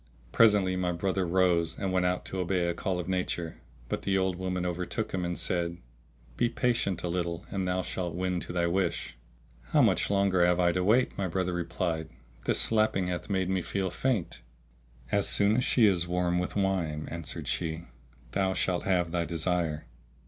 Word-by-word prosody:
Presently 105 Hz, -5 st, +4 dB
my 90 Hz, -1 st, 0 dB
brother 95 Hz, +1 st, -1 dB
rose 85 Hz, -2 st, +2 dB
and 95 Hz, -1 st, -2 dB
went 90 Hz, -1 st, +2 dB
out 90 Hz, 0 st, -1 dB
to 95 Hz, -, -4 dB
obey 90 Hz, -1 st, 0 dB
a 85 Hz, -, 0 dB
call 90 Hz, +1 st, -2 dB
of 90 Hz, -, -4 dB
nature, 90 Hz, -3 st, -2 dB, 0.3 s
but -, -, -3 dB
the 95 Hz, -1 st, +1 dB
old 95 Hz, -1 st, +1 dB
woman 90 Hz, 0 st, -2 dB
overtook 90 Hz, +5 st, -2 dB
him, 95 Hz, -1 st, -2 dB
and 85 Hz, 0 st, -2 dB
said, 85 Hz, -1 st, -1 dB, 0.6 s
"Be 120 Hz, -, +2 dB
patient 115 Hz, -7 st, 0 dB
a -, -, -1 dB
little 85 Hz, 0 st, -2 dB
and 95 Hz, -2 st, -1 dB
thou 90 Hz, 0 st, 0 dB
shalt 90 Hz, -2 st, -3 dB
win 90 Hz, 0 st, -1 dB
to -, -, -6 dB
thy 85 Hz, -1 st, +1 dB
wish." 85 Hz, -4 st, -1 dB, 0.5 s
"How 150 Hz, -3 st, +3 dB
much 95 Hz, -7 st, +2 dB
longer 100 Hz, -3 st, +3 dB
have 90 Hz, 0 st, +3 dB
I 85 Hz, -1 st, +4 dB
to 90 Hz, +1 st, 0 dB
wait," 115 Hz, +6 st, +3 dB
my 95 Hz, -, 0 dB
brother 90 Hz, +1 st, -1 dB
replied, 85 Hz, -2 st, -2 dB, 0.4 s
"this -, -, +3 dB
slapping 110 Hz, -4 st, +2 dB
hath 90 Hz, +1 st, -4 dB
made 95 Hz, -2 st, 0 dB
me 95 Hz, -1 st, +1 dB
feel 95 Hz, 0 st, -2 dB
faint." 110 Hz, -, -1 dB, 0.7 s
"As 100 Hz, -, +2 dB
soon 100 Hz, +1 st, +3 dB
as 125 Hz, -, +2 dB
she 120 Hz, -2 st, +4 dB
is 90 Hz, -4 st, +2 dB
warm 90 Hz, 0 st, +1 dB
with 90 Hz, -, -3 dB
wine," 90 Hz, -6 st, 0 dB
answered 85 Hz, -2 st, -4 dB
she, 80 Hz, 0 st, -2 dB, 0.5 s
"thou 95 Hz, +4 st, 0 dB
shalt 90 Hz, -2 st, 0 dB
have 90 Hz, -3 st, +1 dB
thy 85 Hz, -1 st, 0 dB
desire." 85 Hz, -2 st, -1 dB
90 Hz, 190 wpm, -29 LUFS, 85-95 Hz, 0.7 s, Presently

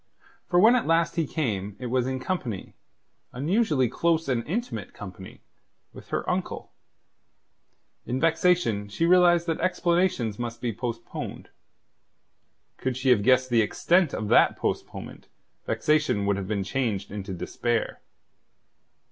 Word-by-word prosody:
For 175 Hz, -, +3 dB
when 225 Hz, +6 st, +7 dB
at 245 Hz, -, 0 dB
last 165 Hz, 0 st, +2 dB
he 165 Hz, -3 st, 0 dB
came, 105 Hz, -, -2 dB
it 125 Hz, -, -7 dB
was 125 Hz, +1 st, 0 dB
in 130 Hz, 0 st, -2 dB
company 130 Hz, -, -4 dB, 0.6 s
unusually 150 Hz, -, +1 dB
close 165 Hz, +5 st, 0 dB
and 125 Hz, -3 st, 0 dB
intimate 175 Hz, -, -4 dB
company 95 Hz, -1 st, -10 dB, 0.5 s
with -, -, -12 dB
her -, -, -3 dB
uncle. -, -, -3 dB, 1.4 s
In 125 Hz, +2 st, -1 dB
vexation 165 Hz, -, +2 dB
she 165 Hz, +11 st, 0 dB
realized 175 Hz, -1 st, +5 dB
that 165 Hz, -2 st, -1 dB
explanations 170 Hz, -, +1 dB
must 120 Hz, -1 st, -4 dB
be 120 Hz, -2 st, -2 dB
postponed. 115 Hz, +1 st, -6 dB, 1.3 s
Could 130 Hz, -1 st, -2 dB
she 130 Hz, 0 st, 0 dB
have 120 Hz, -5 st, +5 dB
guessed 130 Hz, +2 st, +3 dB
the 115 Hz, -1 st, +5 dB
extent 170 Hz, -, +2 dB
of 110 Hz, -, -3 dB
that -, -, +5 dB
postponement, -, -, -5 dB, 0.4 s
vexation 150 Hz, -9 st, +1 dB
would 100 Hz, 0 st, +2 dB
have 95 Hz, -1 st, -4 dB
been 100 Hz, -2 st, -1 dB
changed 100 Hz, -3 st, -2 dB
into 100 Hz, -1 st, -6 dB
despair. 115 Hz, +5 st, -2 dB
130 Hz, 135 wpm, -26 LUFS, 110-170 Hz, 1.4 s, when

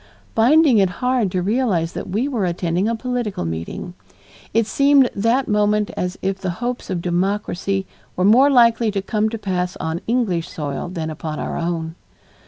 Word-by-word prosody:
finding 260 Hz, +1 st, +5 dB
it 190 Hz, -2 st, +3 dB, 0.2 s
hard 250 Hz, -5 st, +2 dB
to 180 Hz, -1 st, -1 dB
realize 200 Hz, -6 st, 0 dB
that -, -, -6 dB
we 220 Hz, +8 st, 0 dB
were 245 Hz, -8 st, -1 dB
attending 175 Hz, +2 st, 0 dB
a 230 Hz, -, 0 dB
political 240 Hz, -, -3 dB
meeting. 80 Hz, -, -5 dB, 0.6 s
It 230 Hz, 0 st, +2 dB
seemed 275 Hz, +2 st, +4 dB
that 230 Hz, +6 st, +1 dB
moment 210 Hz, 0 st, +1 dB
as 180 Hz, +1 st, -3 dB
if 190 Hz, 0 st, -1 dB
the 190 Hz, -, -3 dB
hopes 245 Hz, +1 st, -4 dB
of 175 Hz, -2 st, -2 dB
democracy 195 Hz, +1 st, -1 dB, 0.3 s
were 185 Hz, -, +1 dB
more 250 Hz, +7 st, +6 dB
likely 235 Hz, -3 st, +4 dB
to 200 Hz, -1 st, -1 dB
come 215 Hz, +2 st, 0 dB
to 225 Hz, -, -4 dB
pass 180 Hz, -3 st, -2 dB
on 160 Hz, +1 st, -3 dB
English 210 Hz, -8 st, 0 dB
soil 145 Hz, +2 st, -4 dB
than 165 Hz, -3 st, -4 dB
upon 155 Hz, 0 st, -5 dB
our -, -, -3 dB
own. 165 Hz, -1 st, -2 dB
200 Hz, 175 wpm, -20 LUFS, 175-235 Hz, 0.6 s, more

